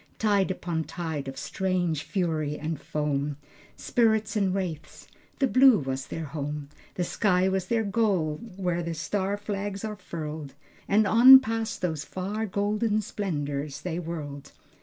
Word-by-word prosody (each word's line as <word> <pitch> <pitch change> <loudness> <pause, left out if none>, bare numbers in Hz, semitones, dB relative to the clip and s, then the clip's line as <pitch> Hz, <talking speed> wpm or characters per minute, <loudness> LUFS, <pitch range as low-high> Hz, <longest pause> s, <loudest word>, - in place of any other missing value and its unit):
Tide 205 -3 +2
upon 170 -3 -2
tide 160 -5 -4
of 135 0 -6
strange 175 -3 -1
fury 155 -5 -1
and 155 -1 -4
foam, 145 -1 -2 0.4
Spirits 220 -3 +1
and 195 -3 +2
wraiths, 175 -5 -4 0.3
the 275 - +3
blue 260 -2 +6
was 135 -4 -3
their 165 - -5
home, 150 -1 -5 0.3
The 180 - 0
sky 185 0 +2
was 190 -1 -1
their 230 +1 +1
goal 195 -8 +1 0.2
where 180 -2 -1
the 170 -1 -3
star 195 +4 -1
flags 205 0 -4
are 215 -1 -4
furled, 155 -6 -6 0.3
And 210 +2 +4
on 250 +6 +10
past 225 -5 -3
those 160 -4 -1
far 205 +4 -3
golden 210 +2 0
splendors 145 -8 -3
they 170 0 -3
whirled. 150 -5 -6
180 Hz, 145 wpm, -27 LUFS, 155-205 Hz, 0.4 s, on